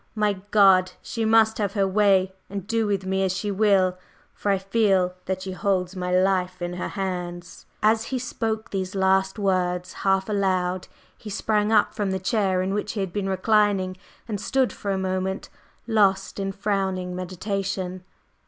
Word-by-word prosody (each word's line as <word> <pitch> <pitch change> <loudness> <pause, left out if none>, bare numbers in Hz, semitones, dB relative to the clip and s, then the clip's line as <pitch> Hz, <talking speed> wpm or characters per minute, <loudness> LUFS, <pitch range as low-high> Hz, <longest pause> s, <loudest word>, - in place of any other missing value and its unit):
My 210 -1 +2 0.2
God! 190 -3 +5
She 230 -1 -3
must 220 0 +4
have 200 -2 -1
her 200 -2 +2
way 190 -1 +3 0.2
and 200 -1 -5
do 225 0 0
with 195 -2 -1
me 190 0 0
as 185 0 0
she 205 0 -2
will, 190 -3 +3 0.3
for 205 - -3
I 195 - +3
feel 195 -2 +2
that 185 0 -3
she 190 - -5
holds 185 -1 -1
my 180 -1 -3
life 185 0 +1
in 175 0 -3
her 180 - -3
hands!" 180 -2 -5 0.2
As 220 +1 +3
he 260 - -2
spoke 225 -3 -3
these 190 0 -3
last 190 +1 +2
words 180 -3 0
half 195 -1 +2
aloud, 185 -3 0 0.3
he 215 - -10
sprang 210 +1 0
up 215 -2 +3
from 205 -2 -1
the 190 - 0
chair 190 -1 +1
in 190 +1 -1
which 210 0 -2
he 220 - -4
had 190 -3 -3
been 200 -2 -2
reclining, 195 -1 +2 0.3
and 210 -3 -3
stood 265 +1 +1
for 200 - -6
a 195 - +1
moment 190 +1 -2 0.4
lost 200 -4 +2
in 195 0 -1
frowning 190 -2 -2
meditation. 185 0 -3
195 Hz, 175 wpm, -24 LUFS, 185-210 Hz, 0.4 s, God